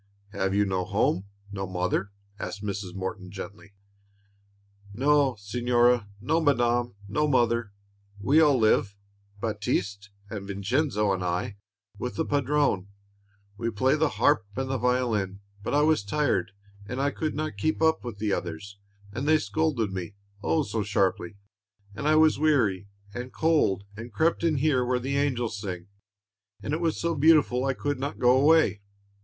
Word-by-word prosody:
"Have 95 Hz, -2 st, -1 dB
you 105 Hz, 0 st, +3 dB
no 95 Hz, -2 st, -1 dB
home, 100 Hz, -1 st, 0 dB, 0.3 s
no 95 Hz, -1 st, -4 dB
mother?" 95 Hz, +2 st, -1 dB, 0.3 s
asked 105 Hz, -, -6 dB
Mrs. 100 Hz, -3 st, -4 dB
Morton, 95 Hz, 0 st, -5 dB
gently. 100 Hz, +1 st, -9 dB, 1.2 s
"No, 140 Hz, +1 st, +3 dB
signora, 120 Hz, +1 st, +2 dB
no, 160 Hz, +10 st, +1 dB
madame, 120 Hz, -5 st, +1 dB
no 150 Hz, +9 st, 0 dB
mother. 120 Hz, -5 st, +1 dB, 0.5 s
We 145 Hz, +10 st, +4 dB
all 145 Hz, -4 st, +5 dB
live, 110 Hz, -3 st, +2 dB, 0.5 s
Baptiste 105 Hz, -2 st, -2 dB, 0.2 s
and 100 Hz, -1 st, -6 dB
Vincenzo 105 Hz, +2 st, 0 dB
and 95 Hz, -1 st, -3 dB
I, 90 Hz, +3 st, -2 dB, 0.4 s
with 125 Hz, -, -4 dB
the 160 Hz, -, -1 dB
Padrone. 140 Hz, -8 st, +1 dB, 0.7 s
We 115 Hz, +2 st, -1 dB
play 125 Hz, +6 st, +2 dB
the 155 Hz, 0 st, +2 dB
harp 145 Hz, -8 st, +3 dB
and 130 Hz, 0 st, -2 dB
the 130 Hz, -, -1 dB
violin; 110 Hz, -6 st, 0 dB, 0.2 s
but 120 Hz, -, -2 dB
I 145 Hz, -, +4 dB
was 155 Hz, -7 st, +3 dB
tired, 125 Hz, +1 st, 0 dB, 0.4 s
and 125 Hz, +4 st, -4 dB
I 140 Hz, +1 st, +1 dB
could 155 Hz, +1 st, -3 dB
not 155 Hz, -6 st, -3 dB
keep 155 Hz, +10 st, 0 dB, 0.2 s
with 120 Hz, -4 st, -7 dB
the 105 Hz, -1 st, -1 dB
others, 95 Hz, +4 st, -5 dB, 0.3 s
and 130 Hz, +6 st, -3 dB
they 155 Hz, 0 st, +5 dB
scolded 155 Hz, -9 st, -1 dB
me, 95 Hz, +2 st, -5 dB, 0.3 s
oh, 155 Hz, +7 st, +1 dB
so 115 Hz, -5 st, -2 dB
sharply! 100 Hz, -2 st, 0 dB, 0.6 s
and 140 Hz, +9 st, -3 dB
I 155 Hz, -, +4 dB
was 155 Hz, -2 st, +4 dB
weary 115 Hz, -11 st, +2 dB, 0.3 s
and 125 Hz, +2 st, -6 dB
cold, 155 Hz, -, +2 dB
and 115 Hz, +3 st, -8 dB
crept 160 Hz, +11 st, +1 dB
in 165 Hz, -2 st, +2 dB
here 135 Hz, -2 st, +2 dB
where 125 Hz, 0 st, +1 dB
the 135 Hz, +3 st, -2 dB
angels 120 Hz, -7 st, -1 dB
sing, 90 Hz, -2 st, -6 dB, 0.7 s
and 145 Hz, -, -3 dB
it 160 Hz, -, -1 dB
was 165 Hz, -2 st, 0 dB
so 170 Hz, 0 st, 0 dB
beautiful 145 Hz, -4 st, +4 dB
I 135 Hz, -1 st, 0 dB
could 145 Hz, -1 st, -2 dB
not 140 Hz, +2 st, -4 dB
go 125 Hz, +1 st, +4 dB
away." 145 Hz, -6 st, +4 dB
120 Hz, 160 wpm, -27 LUFS, 100-145 Hz, 1.2 s, all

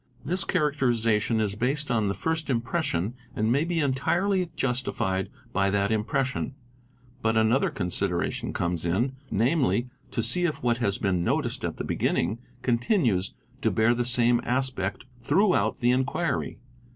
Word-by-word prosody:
This 180 Hz, +5 st, 0 dB
characterization 120 Hz, -, +1 dB
is 105 Hz, -3 st, 0 dB
based 135 Hz, +6 st, -1 dB
on 110 Hz, -3 st, +2 dB
the 100 Hz, -, -1 dB
first 160 Hz, -1 st, -2 dB
impression 120 Hz, -, -1 dB, 0.2 s
and 110 Hz, +1 st, +1 dB
may 140 Hz, +5 st, +3 dB
be 170 Hz, 0 st, -1 dB
entirely 175 Hz, +7 st, +1 dB
justified 120 Hz, -7 st, -1 dB, 0.2 s
by 100 Hz, -1 st, +2 dB
that 100 Hz, +1 st, +1 dB
impression; 125 Hz, +5 st, -1 dB, 0.7 s
but 110 Hz, -1 st, +1 dB
another 110 Hz, +4 st, +3 dB
consideration 90 Hz, 0 st, -2 dB
comes 85 Hz, -1 st, -2 dB
in, 110 Hz, +11 st, 0 dB
namely, 125 Hz, +1 st, +1 dB, 0.2 s
to 115 Hz, -, -2 dB
see 175 Hz, +10 st, +3 dB
if 155 Hz, -7 st, -2 dB
what 120 Hz, 0 st, +2 dB
has 100 Hz, -5 st, 0 dB
been 90 Hz, -3 st, 0 dB
noticed -, -, 0 dB
at -, -, -3 dB
the -, -, -3 dB
beginning 100 Hz, +8 st, 0 dB, 0.2 s
continues 120 Hz, -, +1 dB, 0.3 s
to 110 Hz, -, +2 dB
bear 110 Hz, +3 st, +3 dB
the 120 Hz, 0 st, 0 dB
same 120 Hz, 0 st, +3 dB
aspect 120 Hz, -6 st, -1 dB, 0.2 s
throughout 185 Hz, -, +2 dB
the 120 Hz, 0 st, +4 dB
inquiry. 130 Hz, +3 st, -1 dB
120 Hz, 145 wpm, -26 LUFS, 105-140 Hz, 0.7 s, the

